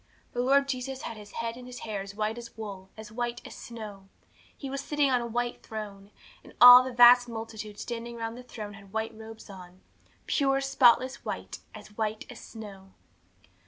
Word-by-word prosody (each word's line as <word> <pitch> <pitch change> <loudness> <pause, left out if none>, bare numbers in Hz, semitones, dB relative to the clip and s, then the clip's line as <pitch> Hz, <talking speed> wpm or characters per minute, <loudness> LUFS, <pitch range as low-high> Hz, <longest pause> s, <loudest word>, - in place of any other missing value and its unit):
The 245 - -1
Lord 275 +2 +3
Jesus 265 0 -4
had 230 - -5
His 210 -1 -12
head 230 0 -3
and 250 0 -11
His 250 0 -9
hair 210 -3 -4
as 200 +1 -9
white 215 +2 -2
as 235 -1 -11
wool, 195 -3 -8
as 215 -1 -10
white 240 +1 -3
as - - -9
snow. 210 -4 -9 0.5
He 275 - -6
was 275 +1 -4
sitting 290 -1 +1
on 250 -1 +2
a 235 - -4
white 240 +1 -2
throne, 205 -3 -8 0.3
and - - -16
all 245 0 +12
the 260 - -4
vast 245 0 +7
multitude 220 -2 -7
standing 235 +1 -5
round 225 0 -4
the 250 - -9
throne 215 -4 -8
had 200 -2 -15
white 220 0 -2
robes 220 0 -11
on 185 -2 -12 0.4
pure, 270 -2 +2
spotless 260 -1 +3
white; - - -5 0.2
as 210 - -12
white 215 0 -2
as 245 - -10
snow. 195 -4 -11
230 Hz, 195 wpm, -28 LUFS, 215-245 Hz, 0.5 s, all